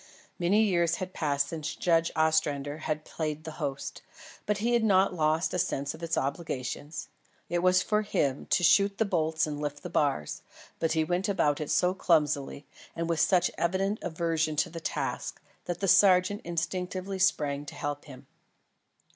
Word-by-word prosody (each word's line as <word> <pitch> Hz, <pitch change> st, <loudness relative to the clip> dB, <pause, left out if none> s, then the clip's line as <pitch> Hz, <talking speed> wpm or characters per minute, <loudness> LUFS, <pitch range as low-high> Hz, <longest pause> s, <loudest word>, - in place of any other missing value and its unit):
Many 195 Hz, +5 st, +3 dB
years 170 Hz, -5 st, +2 dB
had 185 Hz, +1 st, -6 dB
passed 145 Hz, -2 st, 0 dB
since 160 Hz, -2 st, -4 dB
Judge 165 Hz, -1 st, +2 dB
Ostrander 155 Hz, -2 st, +1 dB
had 155 Hz, -1 st, -3 dB
played 155 Hz, -1 st, -4 dB
the 160 Hz, 0 st, -8 dB
host; 140 Hz, 0 st, -4 dB, 0.5 s
but 210 Hz, -1 st, +1 dB
he 235 Hz, +4 st, 0 dB
had 235 Hz, -1 st, +3 dB
not 195 Hz, -2 st, +4 dB
lost 160 Hz, 0 st, +1 dB
a 180 Hz, -, 0 dB
sense 140 Hz, -3 st, -1 dB
of 160 Hz, -, -12 dB
its 165 Hz, -1 st, -1 dB
obligations. 145 Hz, 0 st, -3 dB, 0.4 s
It 175 Hz, +1 st, 0 dB
was 185 Hz, +1 st, +4 dB
for 210 Hz, 0 st, +1 dB
him 140 Hz, -9 st, -1 dB
to 175 Hz, -, +2 dB
shoot 200 Hz, +3 st, +4 dB
the 225 Hz, -, +2 dB
bolts 160 Hz, -4 st, +1 dB
and 150 Hz, -1 st, -5 dB
lift 145 Hz, -1 st, -4 dB
the 180 Hz, -, -6 dB
bars; 140 Hz, -, 0 dB, 0.4 s
but 165 Hz, -, +1 dB
he 160 Hz, -1 st, +2 dB
went 180 Hz, +5 st, -1 dB
about 150 Hz, -7 st, +1 dB
it 150 Hz, -, -4 dB
so 180 Hz, +1 st, +3 dB
clumsily 150 Hz, -6 st, +1 dB, 0.3 s
and 165 Hz, 0 st, -2 dB
with 165 Hz, -1 st, 0 dB
such 180 Hz, -3 st, +3 dB
evident 195 Hz, +4 st, 0 dB
aversion 165 Hz, -2 st, -1 dB
to 150 Hz, -, 0 dB
the 165 Hz, -, -6 dB
task, 160 Hz, -, -3 dB, 0.3 s
that 175 Hz, +1 st, -4 dB
the 195 Hz, -, +1 dB
sergeant 190 Hz, +1 st, +5 dB
instinctively 180 Hz, +3 st, -3 dB
sprang 145 Hz, -6 st, +1 dB
to -, -, -8 dB
help 145 Hz, 0 st, -4 dB
him. 130 Hz, -1 st, -12 dB
165 Hz, 175 wpm, -29 LUFS, 150-185 Hz, 0.5 s, sergeant